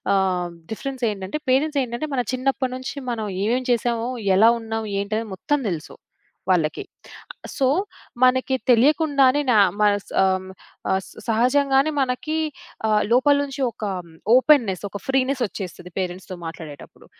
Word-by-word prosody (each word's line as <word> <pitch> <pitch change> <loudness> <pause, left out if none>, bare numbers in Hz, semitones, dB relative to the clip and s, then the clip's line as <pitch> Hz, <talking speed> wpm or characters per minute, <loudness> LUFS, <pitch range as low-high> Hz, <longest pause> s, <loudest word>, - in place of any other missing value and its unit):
ఆహ్, 185 -2 +1 0.2
డిఫరెన్స్ 260 +3 -5
ఏంటంటే, 195 +7 -5
పేరెంట్స్ 290 +3 +2
ఏంటంటే, 245 +5 -4
మన 250 - +2
చిన్నప్పటి 260 0 -1
నుంచి 255 -1 -6 0.2
మనం 225 -2 -3 0.2
ఏమేం 245 +4 +1
చేసామో, 235 -1 0 0.3
ఎలా 225 +3 +7
ఉన్నాం 225 0 -4 0.2
ఏంటి 200 +2 -3
అనేది 225 0 -3
మొత్తం 290 +10 0
తెలుసు, 165 -4 -5 0.6
వాళ్ళకి. 165 -4 +1 0.7
సో, 270 - +2 0.6
మనకి 260 +1 +3
తెలియకుండానే, 280 +2 +4
నా 225 - +4 0.2
మనసం 205 -1 +1 0.7
ఆహ్, 190 - +1
స - - -14 0.2
సహజంగానే 270 +5 +3
మనకి 270 +5 -1 0.5
ఆహ్, 215 -1 +3
లోపల 260 +4 +5
నుంచి 275 0 -6
ఒక 225 - -11 0.5
ఓపెనెస్, 250 -9 +4
ఒక 200 - -7
ఫ్రీనెస్ 265 0 +1
వచ్చేస్తది. 180 -2 -7
పేరెంట్స్‌తో 185 0 -4
మాట్లాడేటప్పుడు. 160 -3 -10
240 Hz, 130 wpm, -22 LUFS, 200-270 Hz, 0.7 s, ఎలా